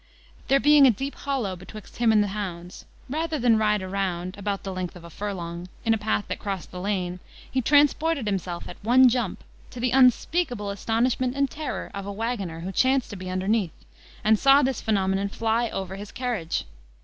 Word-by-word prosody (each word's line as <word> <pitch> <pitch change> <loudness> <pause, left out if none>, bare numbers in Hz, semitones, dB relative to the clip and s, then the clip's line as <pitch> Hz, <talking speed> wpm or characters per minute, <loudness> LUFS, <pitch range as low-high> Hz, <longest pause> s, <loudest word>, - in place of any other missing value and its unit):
There 275 - +4
being 295 -1 +7
a - - +7
deep 270 +5 -2
hollow 260 -9 -2
betwixt 195 +4 -12
him 235 -2 +3
and 210 -1 +5
the 205 - -2
hounds, 180 -4 -6 0.2
rather 315 +3 -2
than 235 -4 +3
ride 210 -2 +2
round, 185 -1 -2
about 200 0 -3
the 195 - -4
length 185 -1 -4
of 175 - -11
a 170 - -11
furlong, 175 -3 -5 0.2
in 225 - +4
a - - +1
path 210 0 0
that - - -4
crossed 195 -3 -5
the 180 - -6
lane, 185 -2 -2 0.3
he 260 - +1
transported 295 +1 +3
himself 185 -4 -3
at 180 - -11
one 250 +3 +6
jump, 235 -5 -2 0.3
to 250 - -9
the 245 0 0
unspeakable 250 - +2
astonishment 245 +5 0
and 275 -2 +1
terror 305 0 -5
of 200 -1 -6
a - - -3
waggoner 200 -6 -3
who 185 +3 -4
chanced 260 +5 +2
to - - -6
be 185 -1 -7
underneath, 190 0 -1 0.4
and 215 0 +4
saw 275 +1 +6
this 265 0 0
phenomenon 195 -2 0
fly 225 +2 0
over 190 -1 -4
his 205 0 -8
carriage. 240 -10 -2
210 Hz, 195 wpm, -25 LUFS, 190-250 Hz, 0.4 s, being